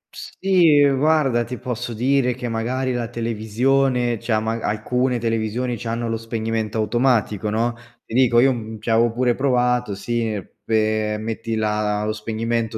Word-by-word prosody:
Sì, 165 -7 +3
guarda 135 -3 +2
ti 125 +2 -6
posso 125 -1 -4
dire 125 +1 +1
che 125 -1 -5
magari 125 +3 -1
la 120 -1 -2
televisione, 120 +2 0
cioè 115 -2 0
ma 110 +1 -2
a - - -3
alcune 125 +4 0
televisioni 115 +2 -1
c’hanno 115 0 -3
lo 115 - -1
spegnimento 115 -1 -3
automatico, 110 -2 +1
no? 115 +2 0 0.3
Ti - - -11
dico 120 -1 +4
io, 130 +2 +5
mhmm, 110 -2 -7
ci 115 - -3
avevo 115 +1 +3
pure 120 +1 +1
provato 125 -5 +1
sì 115 0 -2 0.2
pe 110 -1 0
metti 115 +1 -4
la 105 -1 0
lo 110 - -1
spegnimento 115 +1 -2
115 Hz, 155 wpm, -21 LUFS, 110-125 Hz, 0.3 s, io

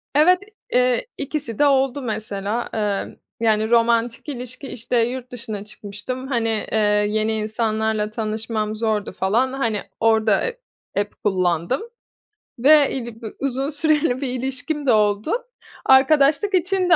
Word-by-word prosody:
Evet, 355 +5 +6 0.3
eee, 250 - +2
ikisi 275 -6 -4
de 295 - +5
oldu, 270 0 +2
mesela. 215 -1 -3
Emm, 210 -3 -2 0.2
yani, 220 -1 +2
romantik 235 +3 +2
ilişki, 255 0 -6
işte, 240 0 -2
yurt 245 +2 -1
dışına 220 -4 -6
çıkmıştım, 215 +5 -6
hani, 235 -4 0 0.2
eee, - - +1 0.3
yeni 215 +1 0
insanlarla 220 0 -1
tanışmam 215 0 -3
zordu 215 -2 -1
falan. 225 +8 +1
Hani, 230 -6 -1 0.2
orada, 220 -2 +3
e 475 0 -5 0.4
app 205 - -8
kullandım 185 - +1 0.8
ve, 290 +3 +6
iii, 235 -3 -5
bi 225 - -5
uzun 270 0 -1
süreli 300 -3 +1
bir 275 - -1
ilişkim 270 +4 -3
de 260 - +4
oldu. 210 +4 +2 0.5
Arkadaşlık 285 +8 +4
için 370 0 +1
de 350 - +8
235 Hz, 135 wpm, -22 LUFS, 215-270 Hz, 0.8 s, de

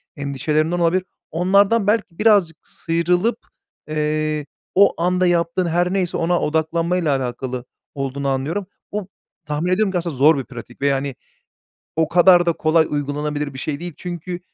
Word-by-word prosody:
endişelerinden 150 +4 -1
olabilir. 175 +2 +2 0.3
Onlardan 200 +5 +3
belki 205 -6 0
birazcık 200 -7 +4
sıyrılıp, 175 +7 0 0.5
eee, 155 0 -1 0.3
o 195 -3 +4
anda 180 +1 +2
yaptığın 170 +1 +1
her 175 +2 +1
neyse 185 -3 0
ona 170 +1 +1
odaklanmayla 160 0 0
alakalı 125 0 -4 0.3
olduğunu 140 0 -3
anlıyorum. 150 +9 -2 0.2
Bu 205 -2 -4 0.4
tahmin 150 +4 -1
ediyorum 195 +1 +2
ki 185 - 0
aslında 170 -3 -3
zor 145 +3 +5
bir 135 - -2
pratik 120 -1 -11
ve 140 - +2
yani 135 -1 -1 0.8
o 160 0 +2
kadar 175 +1 +6
da 170 - +2
kolay 160 0 +3
uygulanabilir 145 0 -2
bir 130 - -7
şey 145 0 -3
değil. 175 0 -6
Çünkü, 175 0 -5
165 Hz, 150 wpm, -20 LUFS, 145-180 Hz, 0.8 s, kadar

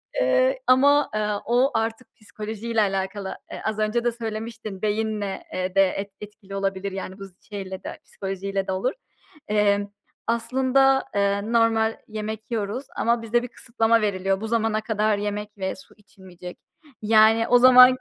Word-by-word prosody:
Eee, - - +2
ama, 285 +3 +5
eee, 215 0 0 0.2
o 250 +4 +3
artık 225 +2 -2
psikolojiyle 220 +1 -3
alakalı, 195 0 -2
eee, - - -7
az 215 0 -2
önce 215 +2 0
de 240 - +2
söylemiştin 220 -3 -6
beyinle, 210 -2 -2
eee, 185 0 -3
de 195 - +6
et 200 +2 -5
etkili 205 -1 -10
olabilir, 195 0 -2
yani, 190 0 -6
bu 195 - -7
z 195 - -15 0.2
şeyle 190 -2 -6
de - - -7
psikolojiyle 195 0 -4
de - - -1
olur. 215 +9 -1 0.5
Emm, 205 -1 +2 0.4
aslında, 265 +3 +2
eee, 200 +2 0
normal 225 -1 +2
yemek 220 +1 -6
yiyoruz 225 +4 -2
ama 235 0 +1
bize 235 +2 0
bir - - -4
kısıtlama 230 -1 +1
veriliyor. 195 -1 0
Bu 220 - -3
zamana 220 -1 0
kadar 215 -1 0
yemek 210 +1 -4
ve 190 -1 -3
su - - -15
içilmeyecek. 185 -3 -12 0.4
Yani, 220 +1 +5
o 245 - +6
zamanki 255 +1 +8
215 Hz, 155 wpm, -24 LUFS, 200-230 Hz, 0.5 s, zamanki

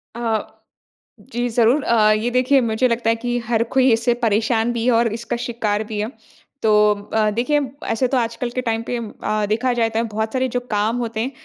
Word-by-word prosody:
अ, 230 -2 -1 0.9
जी 240 +1 0
ज़रूर। 240 +5 +3
अ, 215 -2 +4
ये 215 +3 +1
देखिए 255 +2 +3
मुझे 230 +1 +1
लगता 235 -1 0
है 230 - +3
कि 245 +1 -2
हर 230 -1 +2
कोई 260 -1 +5
इससे 230 +2 +2
परेशान 225 +2 +1
भी 235 -1 -2
है 250 - +4
और 235 0 +3
इसका 230 +1 -4
शिकार 215 -3 -1
भी 215 -1 -5
है। 215 +3 -2 0.5
तो 220 - +3 0.4
अ, 215 -1 +3
देखिए 250 +7 +1 0.3
ऐसे 225 +3 +1
तो 260 - 0
आजकल 235 +1 -2
के 255 +1 -3
टाइम 225 -2 -1
पे 245 - -1
अ, 215 -2 -3
देखा 235 +4 +1
जाए 230 -2 +1
त - - +1 0.2
बहुत 220 +1 -2
सारे 260 0 +1
जो - - +3
काम 215 +3 +1
होते 230 -2 -3
हैं, 245 +4 -1
230 Hz, 210 wpm, -20 LUFS, 220-245 Hz, 0.9 s, कोई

